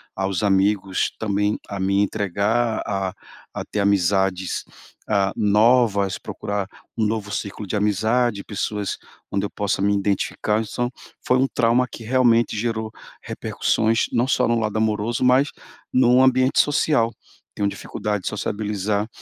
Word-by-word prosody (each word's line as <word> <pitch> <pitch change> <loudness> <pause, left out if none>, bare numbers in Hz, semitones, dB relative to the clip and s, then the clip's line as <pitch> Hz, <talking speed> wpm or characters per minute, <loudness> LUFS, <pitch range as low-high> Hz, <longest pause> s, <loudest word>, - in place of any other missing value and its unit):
aos 95 -1 -1
amigos, 95 -1 +1
também 105 -1 0
a 100 - -5
me 100 +1 +2
entregar 105 +4 0
a 95 -2 -1
a - - -11 0.5
a - - -5
ter 105 - -4
amizades 95 -1 +1 0.5
a 100 -2 +2
novas, 105 -2 +3
procurar 100 -1 -4 0.3
um 110 - +1
novo 105 -2 -3
ciclo 105 +1 -4
de 100 - -3
amizade, 105 +2 +1
pessoas 105 0 -3 0.3
onde 100 0 0
eu - - -4
possa 100 -2 -2
me 100 +1 +2
identificar. 100 +2 0
Então, 120 +3 -3 0.3
foi 125 - +3
um 135 - +3
trauma 120 0 +2
que 115 - -9
realmente 120 -2 +3
gerou 110 0 -2 0.3
repercussões 110 +1 0
não 120 +2 +1
só 125 -2 +2
no 115 0 +2
lado 110 -1 -1
amoroso, 110 +2 0
mas 130 +3 +4 0.4
num 125 0 +5
ambiente 130 0 +3
social, 145 -5 +2 0.4
tenho 100 - 0
dificuldade 105 0 -3
de - - -1
sociabilizar 105 0 -2
105 Hz, 145 wpm, -22 LUFS, 100-115 Hz, 0.5 s, num